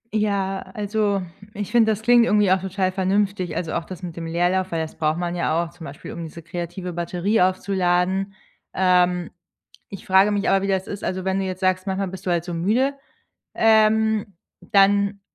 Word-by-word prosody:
Ja, 200 -2 0 0.2
also, 205 -2 0 0.3
ich 205 -1 -5
finde, 225 -2 +4
das 215 0 -3
klingt 240 +1 +6
irgendwie 210 -4 +3
auch 190 -1 +3
total 190 0 -1
vernünftig, 190 -1 0
also 165 -3 -3
auch 170 - -1
das 185 +2 -10
mit 170 -2 -6
dem 165 -1 -5
Leerlauf, 180 +3 0
weil 165 - -1
das 160 -1 -5
braucht 155 0 0
man 175 0 -2
ja 170 -1 0
auch, 170 - -8
zum 170 -1 -12
Beispiel, 140 +1 -9
um 170 - -6
diese 165 +1 -9
kreative 175 +2 -6
Batterie 175 +5 0
aufzuladen. 185 +1 +1 0.4
Ähm, 180 -1 +2 0.6
ich 195 - -10
frage 190 +2 +4
mich 205 -1 0
aber, 195 0 +3
wie 195 - -2
das 190 -1 0
ist 200 - -6
also 185 0 -2
wenn 190 +1 0
du 195 - -1
jetzt 185 0 -5
sagst, 185 +1 +1
manchmal 190 0 -1
bist 190 0 -9
du 180 - 0
halt 170 -2 +1
so 175 0 -6
müde, 225 +11 +1 0.6
ähm, 220 -2 +3 0.2
dann 200 -1 +3
190 Hz, 195 wpm, -22 LUFS, 175-200 Hz, 0.6 s, klingt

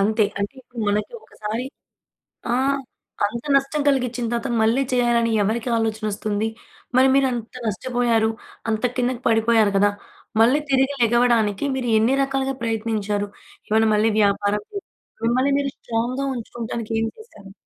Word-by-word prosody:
అంతే. 215 +2 +3
అంటే 200 +3 -2
ఇప్పుడు 245 -1 -9
మనకి 210 +2 -1
ఒకసారి 215 +3 -5 0.9
ఆ! - - +3 0.7
అంత 235 +4 -4
నష్టం 275 +2 +1
కలిగించిన 250 -3 +1
తర్వాత, 235 +2 -1
మళ్ళీ 225 +5 +3
చేయాలని 240 -2 +2
ఎవరికీ 225 +4 -1
ఆలోచన 220 -1 -1
వస్తుంది? 210 +1 -1 0.5
మరి 260 - +6
మీరు 275 -1 +4
అంత 235 -2 -5
నష్టపోయారు. 230 0 +1 0.4
అంత 220 +1 -1
కిందకి 250 0 0
పడిపోయారు 225 -2 +3
కదా! 205 +1 +4 0.5
మళ్ళీ 255 +6 +5
తిరిగి 270 +1 +3
లెగవడానికి 235 -2 +3
మీరు 255 -2 -2
ఎన్ని 225 +4 +3
రకాలుగా 270 0 -1
ప్రయత్నించారు? 215 -2 -1 0.4
ఏమన్న 220 +1 +3
మళ్ళీ 215 +1 +3
వ్యాపారం 205 0 +2
చేశారా? 400 - -6 0.4
మిమ్మల్ని 255 +4 +2
మీరు 275 -1 -1
స్ట్రాంగ్‌గా 240 +4 -2
ఉంచుకోవటానికేం 225 -1 -3
చేశారు? 440 - -14
230 Hz, 135 wpm, -22 LUFS, 215-250 Hz, 0.9 s, మరి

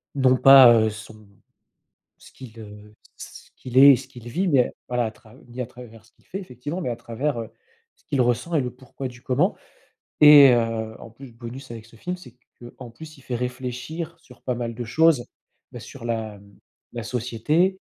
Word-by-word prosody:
non 130 -2 +3
pas, 130 -2 +8
heu, 110 -1 +3
son 110 0 -12 0.9
ce - - -18
qu'il, 120 -4 -13
heu, 105 -1 -13 0.2
ce - - -12
qu'il 130 0 -2
est 140 +1 +9
et - - +3
ce 130 +1 -11
qu'il 120 -2 -12
vit 180 +9 -1
mais 135 -5 +3 0.2
voilà, 125 -1 0
à 110 - -3
trav 110 +3 -20
ni 120 +2 -9
à 125 - -3
travers 115 -3 -14
ce 120 - -25
qu'il - - -33
fait, 195 - -6
effectivement, 150 - -7
mais 125 - -3
à 120 - -4
travers, 120 +4 -4
heu, 115 - -9 0.4
ce - - -34
qu'il 140 -3 -2
ressent 125 +7 0
et - - +2
le 125 - -3
pourquoi 130 +1 -9
du 120 0 -10
comment 145 +10 0 0.6
et 150 -2 +9
heu, 115 -2 -1
en - - -11
plus, 125 +2 -14
bonus 120 +3 -10
avec 115 -2 -9
ce 115 - -21
film, 180 +11 -5
c'est 125 -10 -15 0.3
qu'en 120 0 -12
plus, 155 +5 -13
il - - -16
fait 125 -2 -4
réfléchir 125 +7 -6
sur 125 -7 -19
pas 125 -2 -3
mal 115 -1 -4
de 120 +1 -6
choses. 145 +1 +2 0.5
Bah - - -9
sur - - -12
la, 110 -2 -3
hem, 100 0 -20 0.4
la 120 - -5
société. 125 - -1
125 Hz, 210 wpm, -23 LUFS, 115-135 Hz, 0.9 s, est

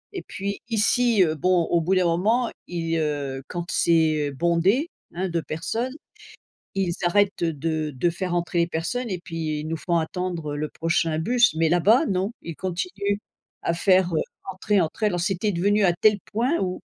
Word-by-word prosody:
et - - -3
puis 200 +1 -5
ici, 230 -1 +3
heu, 155 -2 +1
bon, 180 +3 +2
au 170 -1 +1
bout 185 +4 +1
d'un 185 -1 +3
moment, 220 +8 +2 0.2
ils, 165 -1 -2
heu, 145 -3 -2
quand 175 -1 -4
c'est 155 -3 +2
bondé, 175 - +2 0.3
hein, 190 +2 -1
de 170 -1 -1
personnes, 225 - -3 0.8
ils 190 -3 0
arrêtent, 200 +1 +2
heu, 165 -1 +1
de 155 +1 -2
de 170 +7 +2
faire 175 +1 -3
entrer 175 0 -1
les 170 - +3
personnes 225 +10 -3
et 185 - -2
puis 160 -3 -4
ils 150 - -6
nous 165 - -2
font 170 0 0
attendre, 165 -2 -2
heu, - - -4
le 155 0 -2
prochain 165 -1 0
bus. 235 +2 +3
Mais 160 0 +2
là-bas, 215 - +4
non, 190 +3 -1
ils 165 - -6
continuent 190 +2 -2 0.5
à - - +1
faire, 185 0 +3
heu, 155 - +2 0.3
entrer, 200 +2 0
entrer. 175 +6 -1
Alors 175 -4 0
c'était 195 +2 0
devenu 200 +4 +2
à 175 - +4
tel 210 +4 +3
point 245 +10 +1
ou 185 -1 -2
175 Hz, 190 wpm, -24 LUFS, 165-200 Hz, 0.8 s, là-bas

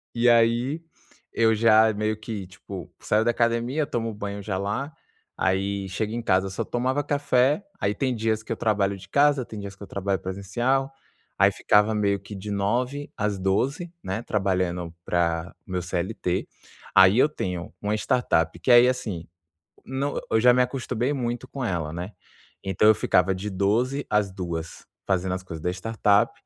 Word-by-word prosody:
E 120 +1 +4
aí, 120 +6 +3 0.5
eu 110 -1 +3
já, 110 0 +5
meio 110 +1 -1
que 110 -3 -6
tipo, 95 -1 -9
saio 110 +1 +1
da 120 - +4
academia, 120 +6 0
tomo 115 -2 -2
banho 100 -1 -5
já 95 -2 -2
lá, 130 +10 -3 0.4
aí 95 +1 -1
chega 105 +3 -2
em 120 - -2
casa, 95 -2 +1
só - - -2
tomava 130 +4 -1
café. 145 +3 +2
Aí 105 - 0
tem 130 0 0
dias 110 0 -1
que - - -9
eu - - +1
trabalho 100 -2 +1
de 95 0 -13
casa, 140 0 +3
tem 110 -2 -8
dias 100 -1 -7
que 95 - -31
eu 100 - -8
trabalho 100 0 -2
presencial. 120 +9 -1 0.4
Aí - - +5
ficava 105 +1 +3
meio 100 -1 +1
que 105 - -10
de 105 +2 -6
9h 125 +8 -1
às 105 -2 -1
12h, 135 - 0
né, 95 +5 -3
trabalhando 90 -5 -1
para 85 -1 0
meu 90 -1 -3
CLT. 90 +1 -2 0.5
Aí 95 +3 +7
eu 135 - +6
tenho 90 - -5
uma 105 +1 0
startup 85 -8 +1
que - - -3
aí, 120 +1 +8
assim 110 -10 -2 0.6
Não, 135 +2 -2
eu 110 - +4
já 125 +2 +6
me 125 - +4
acostumei 125 0 -1
muito 120 -1 -3
com 135 0 -5
ela, 85 -6 -2
né? 90 +4 -5 0.5
Então 95 +2 +2
eu 110 - +8
ficava 90 +1 +2
de 95 +3 -4
12h 115 +9 0
às 105 -2 +1
14h 85 -3 -6 0.2
fazendo 95 -1 0
as 95 - -3
coisas 85 -3 -8
da 90 - +1
startup, 105 +2 +2
105 Hz, 175 wpm, -25 LUFS, 95-120 Hz, 0.6 s, aí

